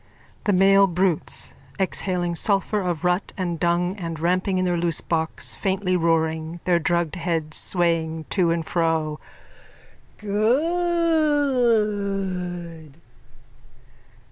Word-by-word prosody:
_ - - -31
THE 205 - +3
MALE 195 +1 +5
BRUTES: 180 -2 0 0.2
_(Exhaling 180 -2 -1
sulphur 200 +3 +1
of 175 -3 -3
rut 180 +2 0
and 175 -3 -3
dung 175 +2 +1
and 165 -4 -5
ramping 185 +3 0
in 185 - +1
their 175 -1 +1
loosebox, 165 -1 -1
faintly 190 -2 -1
roaring, 160 -1 0
their 175 -2 +2
drugged 170 -1 -1
heads 165 -3 -1
swaying 165 -3 0
to 180 -4 +2
and 165 -1 -1
fro.)_ 160 -3 -1 1.0
Good! 215 - 0
180 Hz, 105 wpm, -23 LUFS, 165-200 Hz, 1.0 s, MALE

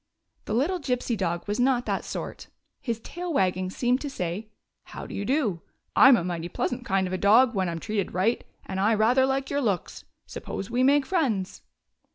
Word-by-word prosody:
The 210 - -2
little 335 +10 +1
Gypsy 250 -4 -1
dog 175 -3 -2
was 205 +2 -2
not 245 -1 +2
that - - -1
sort. - - -6 0.3
His 230 -3 -3
tail 355 +7 -6
wagging 185 - +1
seemed 245 +6 0
to 290 - -4
say: 190 -2 -4 0.2
" - - -55
How - - -6
do - - -9
you 200 - -3
do? 235 - 0 0.3
I'm 265 -2 +8
a 175 - -2
mighty 170 -1 -4
pleasant 245 +7 -2
kind 190 -1 +1
of 185 - -4
a 185 - -1
dog 230 +5 +5
when 190 -3 0
I - - -2
am 165 - -4
treated 210 0 -2
right, 195 +7 +1 0.2
and 190 - -4
I 215 +3 +3
rather 245 +5 +3
like 270 0 -1
your 285 0 0
looks. 200 -8 -2 0.2
Sup - - -8
pose 195 +3 -5
we 245 +1 +1
make 280 +1 +4
friends 245 - -1
225 Hz, 215 wpm, -26 LUFS, 190-265 Hz, 0.3 s, I'm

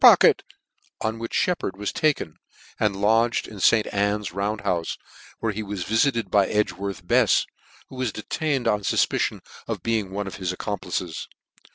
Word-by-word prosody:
pocket," - - +8 0.6
on 110 +1 -1
which 115 - -5
Sheppard 170 - 0
was 105 0 -2
taken, 145 - 0 0.4
and 100 -2 +1
lodged 115 +3 +3
in 105 - -10
St. 110 +3 +5
Anne's 100 -1 0
Round 100 +3 -2
houfe, 85 -2 -1 0.4
where 115 - +1
he 105 +1 -4
was 100 -3 -4
vifited 115 -2 +1
by 100 -2 +4
Edgworth 100 -3 -1
Befs, - - +4 0.4
who 130 - -10
was 130 -3 0
detained 135 +5 -2
on 105 0 +2
iufpicion 100 - +1 0.3
of - - -4
being 110 -4 0
one 100 +2 -3
of 95 - -6
his 90 -2 -2
accomplices. 90 -3 -4
105 Hz, 160 wpm, -24 LUFS, 95-115 Hz, 0.6 s, pocket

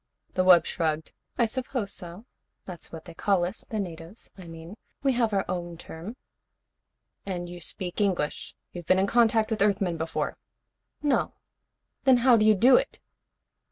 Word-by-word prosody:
The 185 - +2
wub 180 -3 +7
shrugged. 160 -2 -2 0.3
"I 235 - +4
suppose 250 -3 -3
so. 175 +5 -9 0.4
That's 180 -3 -9
what 165 -1 -9
they - - -10
call 180 +1 +1
us, 185 +5 -5
the 220 - -2
natives, 170 +1 -7
I 185 -3 -11
mean. 165 +5 -10 0.3
We 270 -1 +3
have 235 -2 +1
our 195 -1 0
own 175 -2 -4
term." 170 +7 -9 1.1
"And 180 -3 -4
you 175 0 -9
speak 180 +3 -4
English? 180 -7 -1 0.2
You've 175 -2 -9
been 185 - +4
in 190 - +3
contact 225 0 +3
with 215 - -1
Earthmen 195 -4 +2
before?" 160 0 -2 0.7
"No." 290 -2 +1 0.7
"Then 260 -2 +6
how 250 -2 +7
do 215 -1 +3
you 215 - +6
do 245 +7 +6
it?" - - -2
190 Hz, 165 wpm, -27 LUFS, 175-220 Hz, 1.1 s, wub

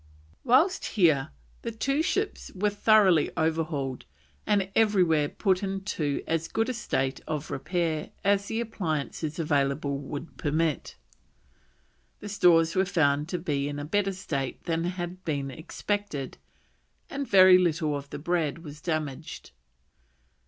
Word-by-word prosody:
Whilst 320 +10 +3
here, 155 -8 +2 0.3
the 235 - -3
two 275 +6 0
ships 400 +5 -1
were 205 +2 +1
thoroughly 200 -6 +4
overhauled 160 -5 -1 0.4
and 195 -2 +1
everywhere 180 -9 +3
put 190 -2 +1
into 190 -7 -2
as 165 0 -1
good 225 +2 -1
a - - -1
state 135 - -2
of 155 -1 -4
repair 165 -4 -2
as 200 0 +2
the 225 +1 -1
appliances 155 -8 -3
available 140 -3 0
would 145 +3 -7
permit. 155 0 -1 1.2
The 205 - -7
stores 170 -5 +4
were 190 - +4
found 150 -5 +1
to 180 - -1
be 145 -5 -1
in 145 0 -4
a 145 - -4
better 195 +4 +1
state 140 -8 -4
than 165 0 -1
had 180 0 -4
been 140 -4 -2
expected, 160 -1 -4 0.7
and 280 -1 -4
very 185 -1 +8
little 155 -4 +1
of 140 0 -6
the - - -6
bread 165 0 -1
was 150 -1 -10
damaged. 155 - -4
165 Hz, 135 wpm, -27 LUFS, 150-195 Hz, 1.2 s, very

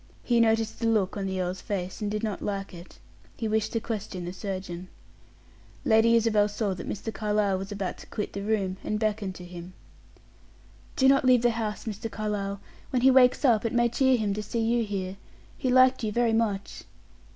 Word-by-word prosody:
He 240 -1 +2
noticed 225 -1 +2
the 230 - 0
look 210 -4 +1
on 200 -2 -2
the 190 0 -2
earl's 180 0 -2
face, 190 0 -4
and 210 - -1
did 210 +1 -3
not 215 -3 -2
like 200 -2 -4
it; 175 0 -12 0.4
he 225 - -2
wished 215 0 0
to 230 - +1
question 210 -5 -5
the 175 - -5
surgeon. 185 -3 -5 1.0
Lady 225 +1 +5
Isabel 215 -2 +3
saw 205 -1 -1
that 180 - -7
Mr. 215 +2 -4
Carlyle 210 -2 0
was 195 +2 -6
about 200 -2 -4
to - - -12
quit 210 - -4
the 200 - -4
room, 200 -3 -1
and 215 - -1
beckoned 210 -3 -1
to 180 - -9
him. 175 +1 -9 1.2
"Do 265 - +4
not 275 0 +5
leave 250 -2 +5
the 240 - +4
house, 220 -2 -3
Mr. 220 0 -4
Carlyle. 200 -2 -3 0.3
When 250 -2 0
he 265 - +7
wakes 255 +2 +5
up, 225 -5 +4
it 230 - -1
may 240 0 +3
cheer 260 +2 +3
him 210 -3 0
to 210 - -3
see 230 +2 -3
you 230 +1 +2
here; 195 -2 -4 0.4
he 260 - -2
liked 255 0 +5
you 215 - 0
very 235 +1 +2
much." 210 -3 -1
215 Hz, 205 wpm, -27 LUFS, 195-230 Hz, 1.2 s, he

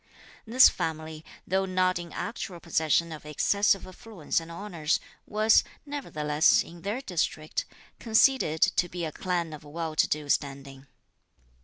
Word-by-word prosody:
This 250 +4 +8
family, 160 -1 -4 0.2
though 190 +1 +1
not 185 -1 +1
in 170 -1 -8
actual 175 +3 -5
possession 165 0 +1
of 155 - -8
excessive 195 +6 +1
affluence 185 -4 -3
and 165 0 -10
honours, 170 -3 -2 0.3
was, 215 +1 +4 0.2
nevertheless, 155 - +2
in 170 0 -13
their 210 +8 -3
district, 165 - -2 0.3
conceded 225 - +3
to 175 - +2
be 175 -1 -4
a 155 - -4
clan 175 -3 -2
of 150 - -10
well 160 +1 -5
to - - +3
do 150 -1 -2
standing. 140 -1 -2
170 Hz, 140 wpm, -27 LUFS, 155-195 Hz, 0.3 s, This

